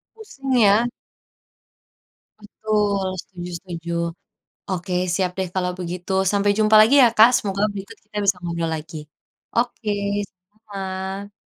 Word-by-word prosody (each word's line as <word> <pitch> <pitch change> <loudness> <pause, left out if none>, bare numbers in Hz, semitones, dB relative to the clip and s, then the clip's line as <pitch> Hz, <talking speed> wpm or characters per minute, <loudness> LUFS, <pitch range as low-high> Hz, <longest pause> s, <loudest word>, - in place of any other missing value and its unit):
Pusing 275 -12 -5
ya? 215 +3 +4 1.5
Betul, 210 -2 -1 0.2
setuju 180 -2 -9
setuju. 170 -2 -7 0.8
Oke, 185 -1 -3 0.2
siap 185 0 0
deh 190 - -1
kalau 180 -1 0
begitu. 180 +1 -5 0.2
Sampai 205 0 +2
jumpa 215 0 +4
lagi 225 +6 +5
ya 245 - +8
Kak. 220 +2 +9
Semoga 195 -2 -3
berikut 200 -1 -8
kita 210 0 -9
bisa 195 -2 +3
ngobrol 170 -1 -2
lagi. 160 +1 -8 0.6
Oke, 235 -2 -1 0.5
sama-sama. 195 0 -7
195 Hz, 120 wpm, -22 LUFS, 180-215 Hz, 1.5 s, Kak